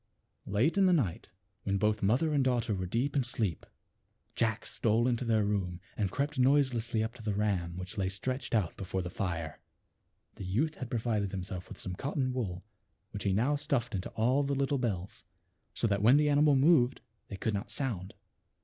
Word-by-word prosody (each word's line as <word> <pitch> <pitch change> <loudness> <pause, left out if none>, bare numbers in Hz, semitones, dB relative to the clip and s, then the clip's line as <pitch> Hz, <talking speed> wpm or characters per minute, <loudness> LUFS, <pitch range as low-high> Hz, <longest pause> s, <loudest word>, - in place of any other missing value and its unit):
Late 120 - +2
in 190 - +6
the 180 - +5
night, 115 - 0 0.3
when 100 0 0
both 105 +1 +1
mother 130 +11 +2
and 140 -2 +3
daughter 120 -4 +1
were 95 -2 -2
deep 125 +10 -1
in 140 - +3
sleep, 110 - -2 0.7
Jack 110 -2 0
stole 115 +2 +1
into 125 0 0
their 110 -3 +2
room 95 -4 -1 0.2
and 100 -3 0
crept 140 +6 -2
noiselessly 125 -4 +3
up 110 +1 -3
to 125 - -12
the 105 -2 -2
ram 95 -5 -1
which 95 +3 -6
lay 95 -1 +1
stretched 130 +6 -2
out 100 -7 0
before 95 -1 -3
the 90 - -5
fire. 85 -4 -3 0.8
Th( 95 - -6
youth 145 +11 +1
had 130 -5 -7
provided 110 -4 0
himself 95 -1 -5
with - - -9
some 90 - -5
cotton 135 - -2
wool 95 -8 -3 0.5
which 100 - -6
he 100 - +3
now 120 +10 +2
stuffed 140 -5 -1
into 95 -2 -3
all 125 +6 +2
the 140 0 0
little 140 0 +1
bells, 100 -7 -3 0.5
so - - +1
0 - - -2
that 100 -1 +1
when 120 +7 +6
the 150 0 +3
animal 145 0 +5
moved 135 -3 +4 0.3
they 100 - -7
could 110 +3 -1
not 100 0 -3
sound. 105 -9 -3
110 Hz, 195 wpm, -31 LUFS, 100-130 Hz, 0.8 s, in